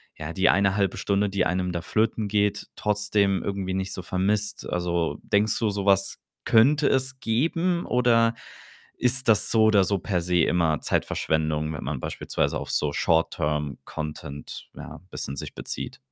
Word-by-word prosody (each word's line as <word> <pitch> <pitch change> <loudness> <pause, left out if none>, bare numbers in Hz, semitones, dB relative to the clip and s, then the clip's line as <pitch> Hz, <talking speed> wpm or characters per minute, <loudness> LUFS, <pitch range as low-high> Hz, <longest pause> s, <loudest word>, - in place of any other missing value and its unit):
ja, 80 +1 -6
die 95 - +3
eine 100 0 +3
1/2 100 -2 0
Stunde, 100 0 0
die 100 0 0
einem 90 0 -1
da 85 - -3
flöten 110 +3 0
geht, 105 0 0
trotzdem 105 -2 +1
irgendwie 95 -2 -3
nicht 95 0 -2
so 95 - -5
vermisst? 100 +3 -1
Also, 85 -1 -1
denkst 105 +2 +1
du, 110 -2 +1
so 100 -1 -3
was 100 -1 +3 0.3
könnte 140 +6 +4
es 130 0 +1
geben 165 +9 0
oder 120 -2 +3 0.7
ist 125 +1 +2
das 110 -2 +4
so 110 -1 +4
oder 105 -3 +5
so 100 +1 0
per 90 0 -1
se 90 0 +1
immer 80 -4 +1
Zeitverschwendung, 75 0 -1
wenn 75 - -6
man 70 0 -3
beispielsweise - - -2
auf - - -6
so 75 -1 0
Short-term-content, 75 -2 -2
ja, - - -9
bisschen 70 - -5
sich - - -7
bezieht? - - -6
100 Hz, 160 wpm, -25 LUFS, 85-110 Hz, 0.7 s, oder